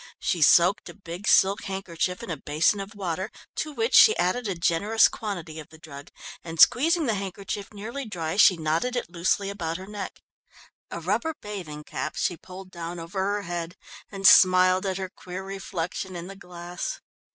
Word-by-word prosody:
She 175 - -1
soaked 175 +6 +5
a - - -11
big 185 0 -8
silk 195 +2 +4
handkerchief 185 -2 -3
in - - -6
a - - -2
basin 155 +7 +1
of 195 +2 -7
water, 190 0 -3 0.3
to 305 - -2
which 450 +10 -2
she 440 - +8
added 220 +6 0
a 195 - -2
generous 175 +6 +3
quantity 170 -7 -6
of 155 - -11
the 160 - -15
drug, 145 -3 -11 0.3
and 165 -1 -8
squeezing 325 - +5
the 230 - +1
handkerchief 195 0 -5
nearly 230 +7 -6
dry, 165 -6 -4
she 190 -3 +6
knotted 165 +11 -1
it 240 -8 -3
loosely 190 +3 0
about 165 -4 -4
her 185 - -9
neck. 205 -1 -7 0.7
A - - -5
rubber 215 - -1
bathing 175 -8 -7
cap 155 - -5
she 175 - 0
pulled 185 +2 -12
down 170 0 -6
over 165 +4 -6
her 200 +2 -1
head, 175 -1 -5 0.4
and 195 -1 +2
smiled 185 0 +6
at 190 -1 -2
her 190 -1 -3
queer 185 +1 -8
reflection 190 -1 -5
in 170 0 -6
the 195 +2 -9
glass. 180 - -6
185 Hz, 185 wpm, -26 LUFS, 170-205 Hz, 0.7 s, she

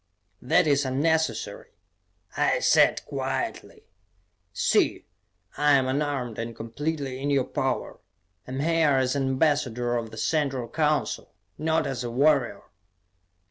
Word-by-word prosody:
"That 180 +8 +3
is 145 -2 +2
unnecessary," 160 +5 -1 0.6
I - - +2
said - - +3
quietly. - - -4 0.7
"See, - - +1 0.5
I 150 0 +4
am 135 -2 +3
unarmed 135 -4 -2
and 115 0 -5
completely 135 +3 -4
in 145 - -1
your 140 -2 +2
power. 135 0 -3 0.5
I - - -8
am 135 - -2
here 160 -2 +3
as 130 +1 +1
an 135 -1 0
ambassador 130 -4 +1
of 115 -1 -3
the - - -11
Central 135 -6 -1
Council, 150 -2 -1 0.2
not 160 0 +1
as 135 -2 -3
a 120 - -3
warrior." 130 -4 +2
140 Hz, 130 wpm, -26 LUFS, 125-150 Hz, 0.7 s, I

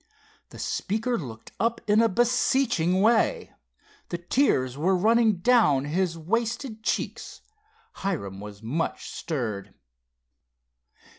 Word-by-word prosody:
The - - -12
speaker 230 +5 -1
looked 115 - -7
up 230 +1 +1
in 210 +1 +5
a 230 - +4
beseeching 240 -5 +2
way. 225 +1 +2 0.6
The 175 - -2
tears 170 - +1
were 175 +7 +2
running 225 +2 +4
down 175 - +4
his 165 +2 -1
wasted 225 - -2
cheeks. - - -3 0.5
Hiram 120 - -4
was 105 +1 -10
much 150 +9 -3
stirred. 110 - -4
185 Hz, 105 wpm, -26 LUFS, 140-230 Hz, 0.6 s, in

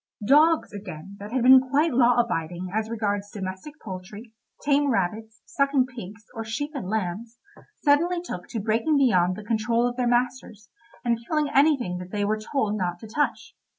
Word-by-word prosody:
Dogs, 310 +5 +4
again, 195 -2 -8
that 205 +2 -8
had 255 -1 0
been 260 +1 +9
quite 280 +5 +1
law 245 -1 +4
abiding 180 -5 -2
as 220 +1 -1
regards 205 -3 -2
domestic 190 +9 -7
poultry, 205 +4 -8 0.3
tame 285 0 +2
rabbits, 220 0 -2
sucking 275 -2 +1
pigs, 225 -4 -10
or 225 - -5
sheep 290 +7 -4
and 245 -11 -5
lambs, 220 +3 -3 0.5
suddenly 335 +5 +3
took 180 - -7
to 225 - -4
breaking 225 +9 +1
beyond 185 -9 +3
the 215 - -8
control 230 +2 +1
of 245 0 -5
their 250 -1 +1
masters, 240 -3 -1 0.3
and 235 -1 +1
killing 305 -2 0
anything 270 - +3
that 180 0 -8
they 205 +1 -1
were 215 +1 0
told 215 -2 -1
not 175 -1 -2
to 220 - -11
touch. 290 +7 -2
225 Hz, 175 wpm, -25 LUFS, 205-265 Hz, 0.5 s, been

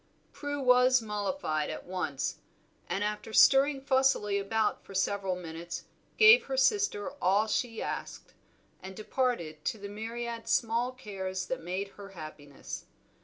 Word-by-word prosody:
Prue 285 0 -4
was 250 -1 +5
mollified 210 - -2
at 155 - -6
once, 175 -7 -3 0.5
and 200 - -1
after 210 +1 -3
stirring 275 +4 +6
fussily 265 -7 +2
about 215 +2 0
for 195 - -12
several 195 -1 0
minutes 170 -1 -7 0.3
gave 465 +2 +8
her 265 -1 -3
sister 270 - +2
all 200 +4 +3
she 225 +1 -2
asked, - - -6 0.5
and 190 0 -9
departed 210 -9 -2
to - - -1
the 200 -1 -8
myriad 230 +2 -5
small 235 +2 +1
cares 190 -6 -5
that 260 - -4
made 185 +4 -3
her 200 -1 -12
happiness. 150 -3 -8
210 Hz, 135 wpm, -30 LUFS, 190-255 Hz, 0.5 s, gave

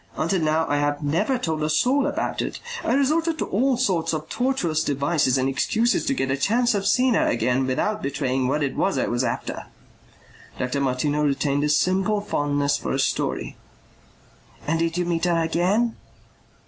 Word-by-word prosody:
Until 165 +3 0
now 155 +1 +1
I 145 - +1
have 145 +1 -1
never 200 - +1
told 160 -9 -2
a 155 - 0
soul 255 - +2
about 290 - -2
it. - - -4 0.2
I 240 - +1
resorted 315 +4 +1
to - - -2
all 255 +5 +1
sorts 185 -10 0
of 155 0 -4
tortuous 185 -12 0
devices 140 -2 +1
and 130 0 +1
excuses 220 - +1
to 275 - +1
get 135 - -1
a 135 - 0
chance 240 - +2
of 200 -1 -1
seeing 255 +2 +3
her - - +2
again 125 +3 +1
without 210 +11 -1
betraying 135 -2 -1
what 145 +3 0
it 135 - -2
was 195 - 0
I - - +1
was 120 +1 -1
after." 115 -1 -4 0.9
Dr. 130 +2 -2
Martineau 140 +3 0
retained 140 0 0
a - - 0
simple 190 +7 +2
fondness 145 -6 0
for - - -3
a 135 - -1
story. - - -1 1.1
"And 165 +2 0
did 165 +1 -1
you 180 - 0
meet 170 0 -1
her 175 -1 +2
again?" 180 +8 +1
160 Hz, 185 wpm, -23 LUFS, 140-210 Hz, 1.1 s, seeing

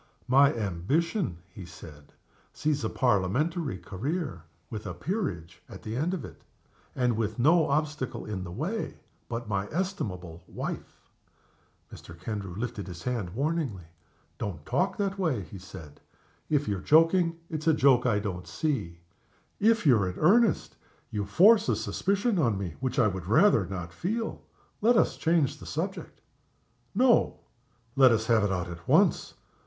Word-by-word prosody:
"My 135 +2 +6
ambition," 115 - -1 0.2
he 100 - -9
said, 80 -4 -13 0.4
"sees 150 -3 -1
a 110 - 0
Parliamentary 130 - 0
career, 120 - -4 0.3
with 105 -1 -5
a 90 - -5
Peerage 90 - -4
at 95 -2 -11
the 110 +1 -4
end 165 +8 0
of 170 - -6
it - - -13 0.5
and 125 -3 +1
with 110 -1 -2
no 155 +6 +4
obstacle 150 -2 -2
in 100 -3 -4
the 90 - -7
way 165 - -3 0.3
but 120 -1 -4
my 100 -2 -1
estimable 100 - -4
wife." - - -7 0.9
Mr. 85 0 -12
Kendrew 100 -2 -5
lifted 110 -1 -4
his 90 -1 -8
hand 110 -8 -3
warningly. 140 - -1 0.6
"Don't 80 -8 -5
talk 190 +2 0
in 200 - +2
that 195 +1 -6
way," 145 - 0
he 95 +2 -10
said. 90 -6 -12 0.5
"If 145 -1 +1
you're 100 -3 -1
joking 165 - +4
it's 155 -1 -5
a - - +7
joke 130 -3 +4
I 110 -4 +2
don't 95 -4 -4
see. 105 - -2 0.6
If 225 0 +3
you're 110 -10 +4
in 90 - -7
earnest 220 +8 +3 0.3
you 105 -2 -2
force 205 - +5
a - - +3
suspicion 200 +1 0
on 115 -9 +2
me 95 -5 -4
which 130 0 -2
I 125 - +5
would 95 -4 -2
rather 120 - +4
not 90 -3 -6
feel. 225 - -3 0.4
Let 230 +2 +4
us - - +3
change 160 -4 +1
the - - -10
subject." - - -5 0.7
"No! 245 +2 +3 0.5
Let 130 -2 +7
us 110 -1 +1
have 115 -2 +3
it 100 - +1
out 90 -1 -2
at 85 -1 -10
once. - - +3
120 Hz, 160 wpm, -28 LUFS, -, 0.9 s, a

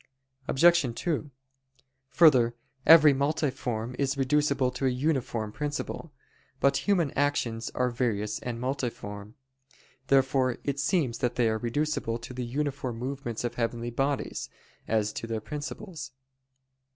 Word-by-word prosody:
Obj. 170 +5 +5 0.2
2: 155 -4 -1 0.8
Further, 130 -5 +5 0.3
every 155 -3 +9
multiform 130 -5 -1
is 140 0 0
reducible 140 -1 +2
to 125 +1 -1
a - - +4
uniform 125 -5 -1
principle. 150 +3 -4 0.5
But 140 0 +3
human 175 -8 +3
actions 125 -5 0
are 125 -1 +1
various 110 -4 -1
and 120 -2 -5
multiform. 115 -5 -4 0.7
Therefore 130 -2 +3
it 140 -1 -2
seems 140 -5 +1
that 120 -1 0
they 120 -2 +3
are 110 0 -1
reducible 130 0 -1
to 120 +2 -9
the 125 0 -4
uniform 135 -1 -3
movements 125 -2 -4
of 120 -1 -2
heavenly 120 0 -2
bodies, 135 +3 -2 0.4
as 110 -1 +1
to 115 - -5
their 115 -1 -2
principles. 150 - -6
130 Hz, 125 wpm, -28 LUFS, 120-145 Hz, 0.8 s, every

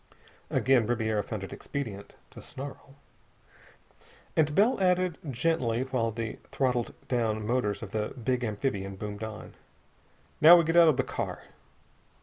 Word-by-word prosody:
Again 125 -4 +3
Ribiera 110 -3 0
found 105 0 -5
it 95 - -7
expedient 110 -8 -6 0.2
to - - -11
snarl. 135 0 -9 1.4
And 150 -2 +2
Bell 215 +2 +3
added, 180 -2 +2
gently, 125 -3 0
while 130 -3 -1
the 115 0 -5
throttled 125 -3 0
down 110 -4 0
motors 110 -3 -1
of 100 - -8
the 105 -1 -1
big 125 0 -2
amphibian 100 -3 -2
boomed 105 +1 -6
on: 110 0 -7 0.9
"Now 170 +3 +10
get 165 +1 -1
out 170 -1 +8
of 150 -5 +4
the - - +2
car." - - -5
120 Hz, 135 wpm, -28 LUFS, 110-140 Hz, 1.4 s, Now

